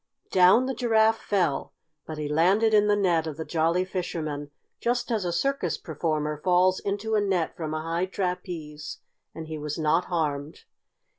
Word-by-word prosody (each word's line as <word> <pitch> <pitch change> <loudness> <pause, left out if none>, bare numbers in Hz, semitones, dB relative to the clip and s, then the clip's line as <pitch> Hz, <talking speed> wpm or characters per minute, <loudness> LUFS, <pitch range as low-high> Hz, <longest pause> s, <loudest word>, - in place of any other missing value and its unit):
Down 185 +7 +6
the 265 - -2
Giraffe 225 -3 +3
fell, 175 -9 0 0.3
but 155 - -6
he 150 -1 -3
landed 190 +9 +3
in 210 0 +5
the 205 - +4
net 175 -5 +2
of 155 -2 -5
the 160 - -4
Jolly 170 +2 +1
Fisherman, 155 -6 -4 0.3
just 240 +1 -1
as 215 -5 0
a 175 - 0
circus 190 -1 0
performer 150 -1 -2
falls 185 0 +3
into 205 +2 -3
a 215 - +3
net 190 -5 0
from 155 -2 -4
a 155 - -3
high 165 +3 -1
trapeze, 180 -5 -4 0.4
and 160 - -6
he 155 -1 -5
was 150 0 -4
not 160 +2 +2
harmed. 150 -4 -2
175 Hz, 170 wpm, -26 LUFS, 155-200 Hz, 0.4 s, Down